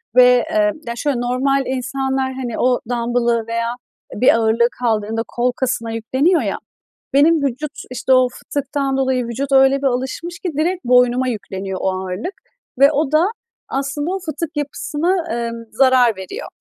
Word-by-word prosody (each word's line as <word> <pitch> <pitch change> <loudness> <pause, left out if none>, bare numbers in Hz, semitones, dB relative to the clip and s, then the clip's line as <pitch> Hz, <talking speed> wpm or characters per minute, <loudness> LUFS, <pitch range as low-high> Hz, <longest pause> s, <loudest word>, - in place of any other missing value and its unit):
ve, 250 -1 +6
eee, 315 -1 +3 0.2
ya, 235 - -2
şöyle 275 +1 -1
normal 265 +3 +1
insanlar, 265 +1 -2
hani, 255 -3 -4
o 250 0 +2
dambılı 235 -1 0
veya 230 +1 -2 0.4
bir 240 +2 +4
ağırlığı 230 +1 +3
kaldırdığında 225 -1 0
kol 245 +1 0
kasına 245 -2 -2
yükleniyor 260 +10 +1
ya, - - -2 0.6
benim 300 +2 +4
vücut, 280 +3 -2 0.2
işte, 255 +1 +1
o 255 0 +5
fıtıktan 275 +1 -3
dolayı 260 -2 +1
vücut 265 +4 -4
öyle 270 0 +5
bir 275 - +2
alışmış 265 +7 -3
ki 360 - -3
direkt 345 -1 -1
boynuma 250 +1 +4
yükleniyor 195 -4 -4
o - - +1
ağırlık 185 - -4 0.5
ve 280 +2 +7
o 300 -1 0
da, 315 +3 +5 0.4
aslında 290 +5 -2
o 385 - -2
fıtık 315 0 -4
yapısına, 315 +4 -1
eee, 235 0 -2 0.2
zarar 255 -2 +4
veriyor. 390 - -7
260 Hz, 155 wpm, -19 LUFS, 235-285 Hz, 0.6 s, ve